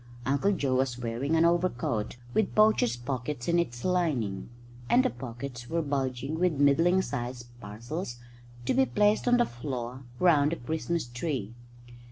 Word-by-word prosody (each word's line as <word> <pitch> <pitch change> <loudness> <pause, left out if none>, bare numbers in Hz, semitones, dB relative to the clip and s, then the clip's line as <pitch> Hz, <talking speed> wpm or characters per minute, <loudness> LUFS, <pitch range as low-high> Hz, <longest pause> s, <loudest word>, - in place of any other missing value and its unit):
Uncle 140 +9 +2
Joe 135 -9 0
was 130 -2 0
wearing 120 +6 -1
an 165 +1 +4
overcoat, 150 -11 0 0.2
with 220 - +1
poacher's 215 - +4
pockets 125 +1 -4
in 170 0 +3
its 120 -8 -3
lining; 150 - 0 0.4
and 255 +2 +5
the 255 - +2
pockets 120 0 -7
were 165 0 0
bulging 135 +1 -2
with 180 -1 +3
middling 165 +7 +4
sized 120 -2 -4 0.2
parcels 120 - -5 0.5
to - - +1
be 265 +1 +3
placed 210 +3 +2
on 245 0 +5
the 240 - +4
floor 125 0 -5 0.2
round 155 -4 +4
the - - 0
Christmas 160 +4 -2
tree. 120 -3 -4
140 Hz, 155 wpm, -28 LUFS, 120-170 Hz, 0.5 s, and